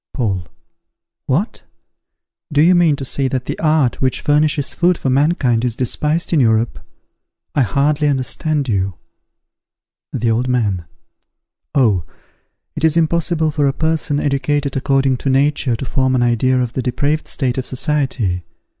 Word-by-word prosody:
Paul. 95 -9 -2 0.8
What! 170 - -1 0.9
do 150 0 +4
you 180 +3 +5
mean 170 -4 +4
to 135 - -6
say 135 +1 0
that 130 -1 -3
the - - -5
art 155 -5 +1
which 130 -1 0
furnishes 150 -1 +1
food 175 0 +2
for 130 - -1
mankind 135 -4 +2
is 120 -3 -1
despised 150 +8 0
in 160 - +4
Europe? 115 -2 +1 0.7
I 145 - +2
hardly 145 +6 +1
understand 145 +2 0
you. 95 -4 -1 1.2
The 115 -1 0
Old 120 +3 0
Man. 105 -9 0 0.9
Oh! 110 - +3 0.7
it - - -5
is 160 0 +3
impossible 160 -1 +1
for 145 -2 +1
a 135 - +1
person 160 -2 0
educated 145 0 -1
according 135 -1 +1
to 135 - -3
nature 135 -2 +1
to 135 - -5
form 130 +1 0
an 125 - +2
idea 125 +2 +2
of 125 -1 -2
the 130 - -2
depraved 145 +5 -1
state 130 -2 -1
of 130 - -4
society. 130 - -1
135 Hz, 150 wpm, -18 LUFS, 125-150 Hz, 1.2 s, you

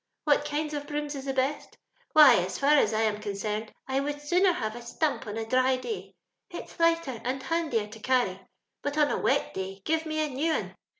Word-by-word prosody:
What 290 -1 +3
kinds 300 +1 -2
of 290 -1 -4
brooms 295 -1 -3
is 275 -1 -6
the 270 - -2
best? 270 +3 -2 0.4
Why, 300 -5 +9
as 185 +1 -1
far 280 +1 +3
as 295 -5 +5
I 220 0 0
am 210 -1 0
con 205 -1 -3
cerned, 210 +2 -3 0.2
I 265 0 0
would 290 +1 -3
sooner 360 +6 +3
have 220 -9 -3
a 240 - -7
stump 270 +1 -2
on 210 +1 -5
a 225 - -3
diy 255 +2 +2
day 440 - -6 0.2
— - - -56
it's - - -9
lighter 330 -8 +1
and 260 +2 -2
handier 315 -10 0
to 215 +1 -12
carry; 220 -6 +1 0.4
but 290 +1 -3
on 295 -1 +3
a - - 0
wet - - +1
day, 190 +1 -6
give 320 0 0
me 310 0 0
a - - -4
new 295 +5 0
un. - - -3
275 Hz, 230 wpm, -28 LUFS, 225-300 Hz, 0.4 s, Why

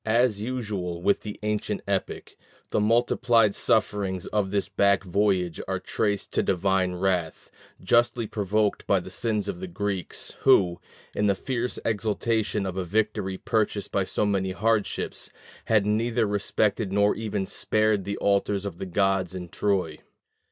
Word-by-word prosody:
As 110 -1 +2
usual 105 -8 -3
with 100 +3 +2
the 105 -1 -7
ancient 105 0 -2
epic, - - -3 0.4
the - - +2
multiplied 115 0 +3
sufferings 100 -5 0
of 105 -2 -1
this 100 0 -1
back 100 0 +2
voyage 95 -3 0
are - - -1
traced 100 -2 -2
to - - +1
divine 95 -1 +1
wrath, 90 -3 -1 0.3
justly 120 +3 +2
provoked 105 0 -1
by - - +4
the - - -9
sins 110 -3 -1
of 180 - -4
the 185 - -5
Greeks, 100 - -3
who, 95 -10 +4 0.3
in 105 - +1
the 100 - +3
fierce 125 +3 -3
exultation 110 -1 0
of 95 -1 -4
a 95 - 0
victory 105 0 -1
purchased 105 -1 -1
by 100 - +1
so 100 - -1
many 95 -2 0
hardships, 110 +1 -1 0.4
had 110 -3 +3
neither 115 +2 +1
respected 105 0 0
nor 100 +1 +3
even 105 -3 -3
spared 110 0 +1
the 100 +2 -4
altars 100 0 +1
of 90 -4 -6
the 95 - -4
gods 95 -1 +1
in 90 -1 -6
Troy. 90 -5 -1
100 Hz, 150 wpm, -26 LUFS, 95-110 Hz, 0.4 s, by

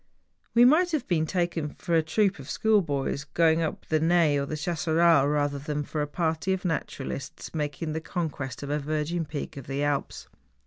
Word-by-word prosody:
We 240 +1 +8
might 335 +6 +4
have 285 -6 -1
been 160 -3 +1
taken 170 -4 -1
for 170 - -4
a 165 - +5
troop 190 +4 +1
of 135 - -10
school 220 -2 +3
boys 140 -3 -2
going 160 +2 +2
up 160 - -3
the 155 - +1
Naye 165 -2 +3
or 140 0 -1
the 155 - -3
Chasseral 165 -2 +3
rather 145 -1 0
than 150 +1 -3
for 150 +1 -3
a 150 - -1
party 160 +4 -1
of 190 0 -4
naturalists 140 -5 -4
making 155 +1 -3
the 160 - -3
conquest 145 - -4
of 140 - -4
a 150 - +1
virgin 155 +3 -2
peak 145 -1 -6
of 135 - -8
the 140 +2 -2
Alps. 145 -1 -2
155 Hz, 195 wpm, -27 LUFS, 145-170 Hz, -, We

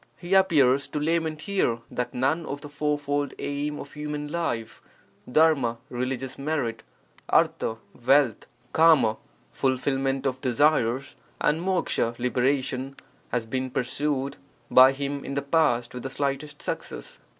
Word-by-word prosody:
He 175 +2 -4
appears 145 -8 +4
to 150 - -3
lament 160 0 0
here 190 -13 0
that 125 - -2
none 140 +7 0
of 140 0 -5
the 145 - -8
fourfold 145 -1 -1
aim 145 +1 -3
of 140 - -9
human 150 0 -4
life 120 -10 -3 0.5
(£PT, 135 -5 +3
religious 130 +1 -3
merit; 135 -7 -2 0.5
3m, 110 - +2 0.3
wealth; 130 -3 +3 0.3
3)FT, 150 -9 +5 0.3
fulfilment 135 +1 0
of 130 -1 -1
desires; 130 -1 +2 0.2
and 155 +3 +1
'W, 175 -10 0
liberation) 130 +2 0 0.4
has 120 -2 -1
been 130 +3 -2
pursued 135 +2 -2 0.3
by 130 +1 +8
him 140 +1 -4
in 140 - -5
the 140 - 0
past 140 -6 +2
with 125 - -6
the 135 - -4
slightest 140 +2 -3
success. - - -5
140 Hz, 130 wpm, -26 LUFS, 125-150 Hz, 0.5 s, by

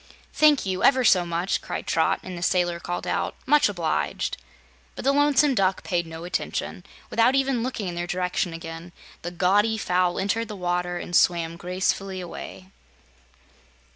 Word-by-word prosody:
"Thank 300 -5 +4
you, 185 -1 -2
ever 260 -1 +5
so 180 -6 +4
much!" 170 +2 -1
cried - - -5
Trot, - - +1
and 185 -1 -7
the 175 - -7
sailor 175 -1 +1
called 175 +1 -4
out: - - -2
"Much 295 -5 +4
obliged!" 170 -6 -1 0.6
But - - -7
the 275 - +5
Lonesome 290 0 +3
Duck 195 -4 +1
paid 175 -2 -1
no 160 0 -8
attention. 180 - -3 0.3
Without 230 +3 +3
even 270 -3 +1
looking 230 -5 -3
in 175 - -3
their 175 0 -4
direction 180 0 -1
again, 165 +1 -8 0.3
the 175 - -4
gaudy 200 +5 +2
fowl 180 -3 +1
entered 225 +4 -1
the 210 - -7
water 175 -1 -2
and 175 0 -5
swam 170 -2 +3
gracefully 185 +2 -2
away. 185 +1 -9
185 Hz, 165 wpm, -25 LUFS, 175-220 Hz, 0.6 s, ever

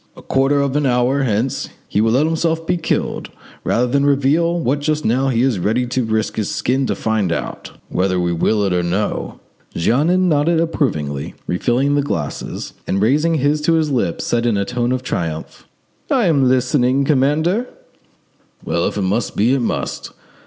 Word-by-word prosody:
A - - -12
quarter 135 +2 +2
of 140 -1 -1
an 145 -2 +2
hour 125 +3 +2
hence 120 +1 -1 0.2
he 105 - 0
will 110 +1 +2
let 135 +5 +3
himself 165 0 0
be 175 - +1
killed 170 - -2 0.3
rather 120 - +1
than 140 +3 +1
reveal 145 +5 +2
what 140 0 0
just 155 +1 -1
now 130 +4 +2
he 120 -1 +1
is 130 -7 +1
ready 110 +7 +1
to 125 +1 -1
risk 110 -1 -1
his 110 - -1
skin 130 +1 0
to - - -1
find 110 -5 0
out, 85 - -5
whether 95 0 0
we 85 -1 0
will 100 +5 +1
or 90 - +1
no." 95 +5 -2 0.4
Jeannin 160 - +2
nodded 160 +1 +2
approvingly, 80 - -2
refilled 125 +10 +1
the 145 - +3
glasses, 85 - -4
and 95 - 0
raising 150 +10 +2
his 150 +1 +1
to 165 +2 +2
his 160 -2 +1
lips, 120 -10 -1
said 120 0 0
in 110 -4 +1
a 100 - 0
tone 120 +2 -1
of 130 0 -1
triumph— 80 -9 -4 0.4
"I 255 -6 +2
am 140 -7 +3
listening, 130 +1 +2
commander." 155 - +1 1.0
"Well, 85 +1 0
if - - -4
it 100 - 0
must 100 +3 -1
be, 115 +6 +3
it 135 - +1
must. 120 - -3
130 Hz, 180 wpm, -19 LUFS, 110-145 Hz, 1.0 s, let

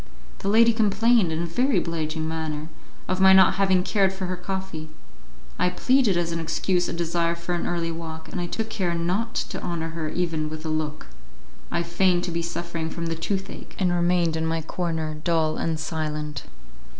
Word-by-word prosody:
The - - -4
lady 230 +3 +6
complained, 220 -2 +3
in 160 +2 -1
a - - -1
very 250 +11 +1
obliging 160 -1 -1
manner, 160 -1 -3 0.4
of 185 0 0
my 190 0 +8
not 190 0 +6
having 190 -2 +4
cared 195 -1 +2
for 190 0 -4
her 185 0 -2
coffee; 180 -3 -5 0.7
I 180 - +3
pleaded 235 +1 +3
as 170 -1 0
an 165 - -2
excuse 175 +2 0
a - - -3
desire 170 0 0
for 170 +1 -4
an 175 - -1
early 170 -1 -1
walk, 160 -1 -7
and 180 - -3
I 175 - -2
took 225 +4 -3
care 180 -5 0
not 185 +7 -1
to - - -2
honour 165 -2 -3
her 160 -1 -3
even 165 -3 -1
with 155 +1 -7
a - - -2
look; 155 -1 -2 0.6
I 170 - 0
feigned 175 +1 +2
to 175 - -2
be 170 0 -1
suffering 170 -1 -3
from 170 +1 -4
the 165 0 -1
toothache, 195 +4 -4
and 185 -2 +2
remained 175 -1 +2
in 160 0 -1
my 165 0 -1
corner 160 -2 -2
dull 160 -3 +1
and 160 -1 -1
silent. 150 -2 -3
170 Hz, 195 wpm, -25 LUFS, 160-185 Hz, 0.7 s, my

